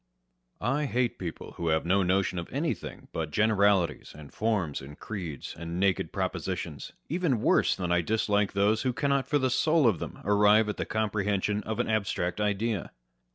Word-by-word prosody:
I 145 +4 +1
hate 125 -2 0
people 85 -3 -6
who 85 - -3
have 80 0 +1
no 95 +3 +3
notion 95 0 +1
of 85 - -7
anything - - -3
but 80 -2 -2
generalities, 100 -3 +2
and 75 -2 -12
forms, 105 -10 -1
and 70 +2 -11
creeds, 85 -10 -6
and 85 +1 -5
naked 95 -1 +1
propositions, - - -4
even 165 -7 0
worse - - +3
than 90 -2 -3
I 90 0 +3
dislike 105 +1 +1
those 100 +2 +2
who 130 -2 0
cannot 140 0 0
for 145 +1 +2
the 130 -2 +1
soul 155 +3 +3
of 105 -9 +3
them - - -6
arrive 105 +2 +5
at 105 - -3
the - - -3
comprehension 105 -1 0
of 110 -1 -3
an - - +1
abstract 100 -3 -1
idea. 105 0 -1
105 Hz, 175 wpm, -28 LUFS, 90-110 Hz, -, arrive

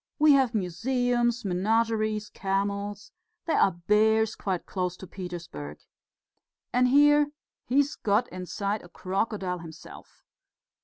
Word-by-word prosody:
We 305 0 +6
have 265 -4 +3
museums, 240 +4 0
menageries, 215 +2 0
camels. 200 +1 -2 0.3
There 330 - +1
are 195 - +4
bears 220 +1 +3
quite 185 -3 -3
close 180 -2 -3
to - - -9
Petersburg! 170 - -7 1.0
And 250 +1 +4
here 295 +2 +5 0.4
he's 280 +3 +2
got 215 +4 +1
inside 200 +3 -3
a 175 - -14
crocodile 190 0 -2
himself...." 165 -1 -13
210 Hz, 110 wpm, -27 LUFS, 185-240 Hz, 1.0 s, We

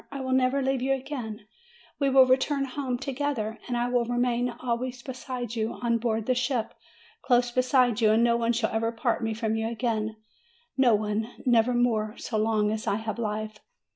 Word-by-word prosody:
I 280 - -5
will 260 0 -3
never 260 +1 +2
leave 265 -1 0
you 270 +1 +1
again; 250 -5 -6 0.6
we 280 -2 +2
will 265 -1 +7
return 270 +2 +2
home 260 -1 -3
together, 255 -5 -3
and 245 -1 -1
I 240 0 0
will 245 -1 +1
remain 245 0 0
always 245 0 -4
beside 250 -3 -5
you 225 0 -1
on 235 -1 0
board 225 -2 -1
the 255 - +2
ship, 245 -2 -1 0.5
close 245 -2 +2
beside 250 -2 +2
you, 220 - +5
and 225 +2 +4
no 235 0 +4
one 235 0 +1
shall 230 -1 0
ever 225 +1 0
part 230 +1 -1
me 225 -1 -1
from 220 -1 -1
you 225 0 -1
again, 225 -2 -2 0.6
no 250 -4 +5
one, 210 +2 -1 0.2
never 240 0 +3
more, 220 -3 +1
so 220 -3 -3
long 215 -1 +1
as 220 0 -4
I - - +2
have 220 0 -4
life!" 215 -1 -3
240 Hz, 195 wpm, -27 LUFS, 220-255 Hz, 0.6 s, will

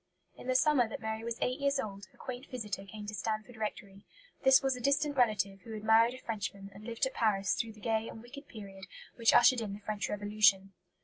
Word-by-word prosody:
In - - -11
the 255 - +1
summer 260 -4 +4
that - - -6
Mary 220 0 -4
was 235 0 -3
eight 255 +2 -1
years 280 0 +1
old, 200 -3 -5
a - - -25
quaint 255 +1 -7
visitor 210 -6 -5
came 210 +1 -9
to 210 - -6
Stanford 215 +3 -3
Rectory. 205 -2 -6 0.4
This 265 +1 +6
was 270 -1 +1
a 250 - -7
distant 285 +3 +1
relative 200 -6 +1
who 225 - -9
had 215 -1 -6
married 225 +3 +5
a - - -9
Frenchman 200 -4 -5
and 200 +2 -12
lived 235 +2 -1
at 265 - -3
Paris 200 -4 +1
through 225 -1 -3
the 215 - -17
gay 225 0 0
and - - -9
wicked 280 +4 -11
period 195 -3 -10 0.3
which 230 -2 +4
ushered 240 0 +6
in 205 -3 -4
the 200 - -7
French 210 0 -3
Revolution. 205 -2 +2
220 Hz, 230 wpm, -32 LUFS, 205-245 Hz, 0.4 s, This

